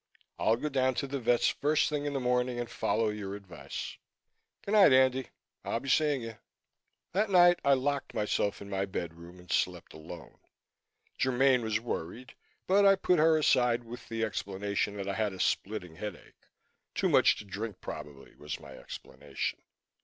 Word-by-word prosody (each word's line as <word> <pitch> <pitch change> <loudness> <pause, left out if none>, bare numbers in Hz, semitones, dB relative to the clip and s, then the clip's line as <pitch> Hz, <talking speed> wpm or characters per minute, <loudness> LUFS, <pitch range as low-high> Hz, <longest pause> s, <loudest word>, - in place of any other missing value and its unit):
I'll 110 - +3
go 125 - -3
down 130 -3 +1
to - - -1
the 140 0 -3
vet's 120 0 +3
first 150 +2 +1
thing 145 -1 -2
in 145 - -2
the 135 - -1
morning 125 -1 0
and 120 - -3
follow 115 -1 0
your 100 -2 -5
advice. 85 -9 -7 0.6
Good 200 - -5
night, 210 -7 +7
Andy. 130 0 +4 0.3
I'll 115 - -1
be 140 - -6
seeing 145 -2 +2
you." 115 -1 -8 0.7
That 205 +3 +1
night 175 -2 +6
I 140 - +5
locked 140 +1 -2
myself 105 -2 -1
in 100 - -11
my 95 0 0
bedroom 85 -1 -6
and 90 0 -12
slept - - -1
alone. 80 +2 -11 0.8
Germaine 130 0 +3
was 110 -1 0
worried 120 +2 -5 0.3
but 200 +2 +4
I 195 0 +7
put 180 -3 +2
her 160 0 +5
aside 125 -5 +3
with 120 +1 -10
the 115 0 -2
explanation 100 0 -2
that 100 -1 -4
I 100 - -1
had 105 -1 -1
a 95 - -10
splitting 90 -6 -1
headache 105 -1 -9 0.5
too - - +1
much - - +5
to 105 - -9
drink, 100 +1 -6
probably, 70 -2 -9
was 75 0 -6
my - - -12
explanation. - - -6
120 Hz, 175 wpm, -30 LUFS, 100-140 Hz, 0.8 s, night